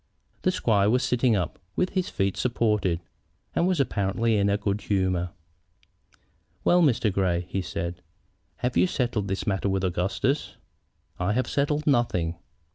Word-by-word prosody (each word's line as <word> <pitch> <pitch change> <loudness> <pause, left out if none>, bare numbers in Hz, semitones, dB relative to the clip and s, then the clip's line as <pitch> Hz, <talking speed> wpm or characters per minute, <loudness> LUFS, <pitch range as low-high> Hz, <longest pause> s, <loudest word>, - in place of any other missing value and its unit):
The - - +2
squire 105 - +2
was 125 +3 +2
sitting 125 -2 +2
up, 90 -5 -2 0.2
with 185 - +1
his 185 -2 -1
feet 95 -1 0
supported, 105 -8 +1 0.5
and 175 - +2
was 185 -4 +1
apparently 115 -2 +1
in 100 -1 +2
a 100 - +2
good 100 0 -1
humor. 95 -3 0 1.3
"Well, 175 0 +5
Mr. 120 - +3
Grey," 90 -2 +1
he 95 - -2
said, 85 0 -4 0.6
"have 125 - 0
you - - +4
settled 120 - -1
this 95 +1 -2
matter 100 -2 0
with 95 0 0
Augustus?" 95 - -1 0.6
"I 90 +3 +1
have 130 +3 +1
settled 145 +2 0
nothing." 115 - +2
105 Hz, 150 wpm, -26 LUFS, 95-125 Hz, 1.3 s, Well